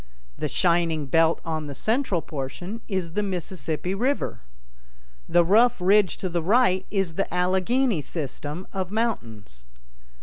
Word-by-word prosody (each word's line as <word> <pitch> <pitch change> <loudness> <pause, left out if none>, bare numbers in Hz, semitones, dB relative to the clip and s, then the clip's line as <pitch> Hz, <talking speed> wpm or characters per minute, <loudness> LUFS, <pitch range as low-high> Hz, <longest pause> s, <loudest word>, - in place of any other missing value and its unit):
The - - -2
shining 170 -3 +1
belt 165 +3 +3
on 155 -2 -3
the 140 - -6
central 220 - 0
portion 175 +10 -6
is 185 -5 -3
the 210 - 0
'Mississippi 180 -2 -3
River'. 255 +8 -1 0.9
The 175 0 +4
rough 230 +6 +4
ridge 195 +2 +3
to 190 - -3
the 170 -1 -1
right 190 0 +3
is 195 -5 0
'the 195 +4 -2
Allegheny 190 - +1
System' 150 +3 -5
of 190 -2 -2
mountains." 115 - -3
180 Hz, 135 wpm, -25 LUFS, 160-205 Hz, 0.9 s, The